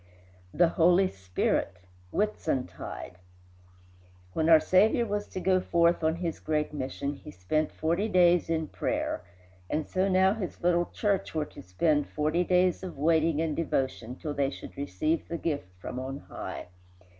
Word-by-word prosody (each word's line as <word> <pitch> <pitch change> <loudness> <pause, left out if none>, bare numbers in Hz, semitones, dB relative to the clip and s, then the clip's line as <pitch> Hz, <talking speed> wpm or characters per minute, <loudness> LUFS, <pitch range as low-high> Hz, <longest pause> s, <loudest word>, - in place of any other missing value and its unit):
XXXI - - -12
THE 175 - +6
HOLY 175 +3 +4
SPIRIT 95 -1 -1 0.4
Whitsuntide 125 - -3 1.1
When 160 +6 +1
our 160 -1 +9
Saviour 215 +8 +3
was 205 -1 -2
to - - -5
go 185 0 +3
forth 170 -1 +2
on 160 +1 +2
his 170 -1 -3
great 150 -1 -1
mission 140 0 -3
he - - -11
spent 90 - -1
forty 170 +7 0
days 175 -3 +4
in 160 -1 -1
prayer; - - -2 0.5
and 155 0 -1
so 190 +1 +1
now 190 +1 +4
his 205 -6 -6
little 175 0 +3
church 200 -5 -1
were 155 -1 0
to - - -12
spend 145 - +1
forty 155 +4 +1
days 180 0 +2
of 185 -5 -7
waiting 160 +1 +2
and 160 -2 -1
devotion 130 -6 -2
till 150 +2 -5
they 140 -1 +1
should - - -9
receive 145 - -1
the 170 - -3
gift 150 - -2
from 125 - -5
on 135 +2 -5
high. - - -7
160 Hz, 160 wpm, -28 LUFS, 145-180 Hz, 1.1 s, our